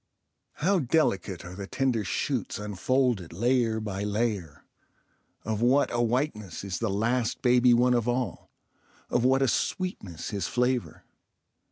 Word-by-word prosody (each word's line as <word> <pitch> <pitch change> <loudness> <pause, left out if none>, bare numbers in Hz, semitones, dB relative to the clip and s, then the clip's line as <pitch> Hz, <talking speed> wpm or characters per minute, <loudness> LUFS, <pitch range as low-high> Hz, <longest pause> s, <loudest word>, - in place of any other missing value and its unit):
How 190 +4 +1
delicate 100 - 0
are 90 - -8
the 100 +1 -7
tender 125 -4 0
shoots 120 +5 -2
unfolded 105 0 0
layer 115 +3 +1
by 100 -2 -4
layer. 105 -7 -2 0.8
Of 110 -1 -2
what, 130 +3 +3
a 120 - +1
whiteness 115 - -1
is 95 -2 -4
the 115 - -1
last 115 +4 0
baby 125 -1 +5
one 125 +1 +4
of 120 -1 +1
all, 120 +1 -2 0.6
of 120 - +2
what 130 +1 +4
a - - +3
sweetness 120 - -2
his 100 -2 -2
flavour. 125 0 -1
120 Hz, 140 wpm, -27 LUFS, 100-125 Hz, 0.8 s, baby